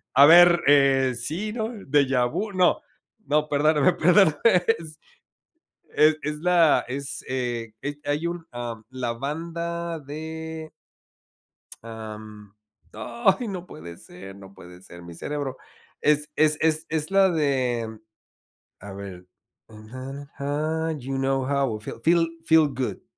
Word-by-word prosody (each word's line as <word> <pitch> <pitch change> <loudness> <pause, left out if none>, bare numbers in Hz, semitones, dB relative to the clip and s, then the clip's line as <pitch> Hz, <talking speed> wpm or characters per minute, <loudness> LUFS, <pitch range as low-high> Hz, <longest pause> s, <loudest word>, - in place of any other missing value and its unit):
a 140 +2 +8
ver, 175 +1 +8
eh, 135 -2 +4
sí, 190 - -3
¿no? 220 -2 -2 0.2
¿Déjà 135 -3 +2
vu? 210 - -3
No, 185 -2 +2 0.4
no, 150 +1 +1
perdóname, 150 +3 +3
perdóname. 175 -1 +4 0.4
Es 155 -1 -11 1.0
es 155 0 +5
es 150 0 -3
la, 170 -2 +3
es, 135 +2 -4
eh, 120 -3 -3
es 145 +1 -4
hay 145 +3 -1
un, 170 -1 -5
am, 120 -2 -6
la 125 -2 -3
banda 170 +5 -4
de 160 +2 -7 1.1
Am, 110 -2 -10 0.4
ay, 235 +1 0
no 185 -3 -6
puede 85 +2 -10
ser, 95 +3 -11
no 100 -1 -14
puede 90 -1 -14
ser, 85 -2 -13
mi 85 0 -10
cerebro. 145 - -4 0.4
Es 150 0 +2
es 155 0 +3
es 160 0 +1
es 155 0 -2
la 195 -1 +5
de, 125 -8 -1 0.8
a 100 0 -9
ver, 95 -2 -9
birds - - -43 0.4
flying 130 +6 -9
high, 155 +3 -2
you 135 +1 -4
know 135 0 0
how 135 -5 0
I - - -14
feel 110 - -8
Feel- 165 0 +3 0.2
Feel 160 -2 +5
Good. 125 -7 -4
145 Hz, 135 wpm, -24 LUFS, 120-160 Hz, 1.1 s, a